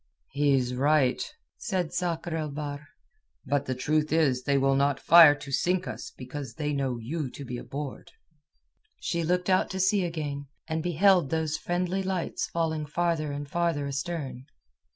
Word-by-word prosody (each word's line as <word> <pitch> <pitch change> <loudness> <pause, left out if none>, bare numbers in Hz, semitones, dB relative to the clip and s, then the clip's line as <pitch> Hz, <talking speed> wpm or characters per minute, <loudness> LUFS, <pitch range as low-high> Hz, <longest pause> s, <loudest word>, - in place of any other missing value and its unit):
"He 145 0 +3
is 125 -1 0
right," 135 0 +2 0.4
said 185 -7 -2
Sakr 170 -2 -2
el 155 -2 -2
Bahr. 145 0 -6 0.6
"But 140 +1 0
the 130 - -1
truth 150 +4 0
is 145 -6 +3
that 140 - -2
they 140 - +4
will 135 0 +3
not 140 0 +2
fire 165 -3 +8
to 140 -1 -9
sink 180 +6 +1
us - - -6
because 130 +2 -7
they 150 -2 -2
know 135 -3 -1
you 135 +5 -4
to 140 - -9
be 120 -1 -5
aboard." 140 0 -7 0.9
She 170 - -1
looked 180 +2 0
out 185 -1 +3
to 190 - -4
sea 195 +1 +3
again, 150 -4 -4 0.2
and 160 0 -1
beheld 175 -1 +3
those 160 -1 0
friendly 180 +3 -1
lights 190 -2 -2
falling 160 -2 -1
farther 165 -1 0
and 145 0 -5
farther 170 -2 0
astern. 140 -2 -4
150 Hz, 170 wpm, -28 LUFS, 140-170 Hz, 0.9 s, fire